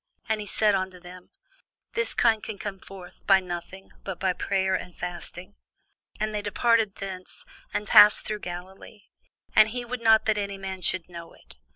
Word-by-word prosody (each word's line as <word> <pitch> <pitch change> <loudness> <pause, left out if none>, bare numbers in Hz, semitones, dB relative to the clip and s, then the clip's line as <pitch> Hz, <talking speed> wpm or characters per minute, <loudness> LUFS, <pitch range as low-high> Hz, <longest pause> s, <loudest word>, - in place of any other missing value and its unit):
And 220 -1 0
he 205 - -7
said 210 +1 +2
unto 190 -1 -2
them, 180 0 -13 0.6
This 465 +1 -1
kind 225 -2 +3
can 215 - -6
come 195 -1 -6
forth 185 -2 -13
by 195 -1 +7
nothing, 185 +1 -7
but 195 -3 -5
by 190 -1 +1
prayer 190 0 0
and 180 -1 -3
fasting. 175 +2 -6 0.7
And 215 0 -1
they 210 - -1
departed 220 0 +2
thence, 190 -2 -6 0.3
and 210 - -2
passed 210 +1 +8
through 210 -1 -3
Galilee; 190 +3 -9 0.5
and 215 0 +7
he 245 +2 -4
would 245 0 -5
not 220 -1 +5
that 215 -1 +2
any 200 -1 -3
man 190 -1 -6
should 170 0 0
know 170 -1 -10
it. - - -16
195 Hz, 180 wpm, -26 LUFS, 185-215 Hz, 0.7 s, passed